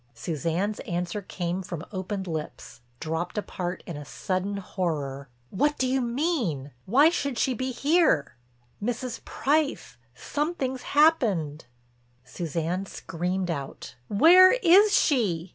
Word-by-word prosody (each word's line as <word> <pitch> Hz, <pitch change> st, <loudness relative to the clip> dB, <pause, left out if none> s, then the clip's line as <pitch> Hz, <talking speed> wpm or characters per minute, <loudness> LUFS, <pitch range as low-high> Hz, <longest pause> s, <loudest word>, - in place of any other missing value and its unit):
Suzanne's 165 Hz, -, -2 dB
answer 175 Hz, +3 st, -3 dB
came 180 Hz, -1 st, -3 dB
from 175 Hz, -2 st, -6 dB
opened 190 Hz, 0 st, -4 dB
lips, 155 Hz, -7 st, -6 dB, 0.2 s
dropped 165 Hz, +4 st, -3 dB
apart 185 Hz, -3 st, -4 dB
in 170 Hz, -, -6 dB
a 145 Hz, -, -7 dB
sudden 190 Hz, +6 st, -3 dB
horror: 145 Hz, -8 st, -3 dB, 0.2 s
"What 295 Hz, +9 st, +1 dB
do 260 Hz, -, +1 dB
you 260 Hz, +1 st, +1 dB
mean? 235 Hz, -, -1 dB, 0.2 s
Why 275 Hz, +10 st, +6 dB
should 280 Hz, -7 st, -2 dB
she 260 Hz, -, +1 dB
be 260 Hz, +2 st, -3 dB
here?" 280 Hz, -, +2 dB, 0.5 s
"Mrs. 245 Hz, +2 st, -3 dB
Price, 285 Hz, -, -1 dB, 0.2 s
something's 280 Hz, -, -3 dB, 0.2 s
happened!" 200 Hz, -, +3 dB, 0.6 s
Suzanne 170 Hz, +5 st, -3 dB
screamed 180 Hz, +2 st, -3 dB
out: 140 Hz, -4 st, -6 dB
"Where 355 Hz, -, +7 dB
is 415 Hz, -3 st, +5 dB
she?" 190 Hz, -, +1 dB
190 Hz, 120 wpm, -26 LUFS, 165-265 Hz, 0.6 s, Where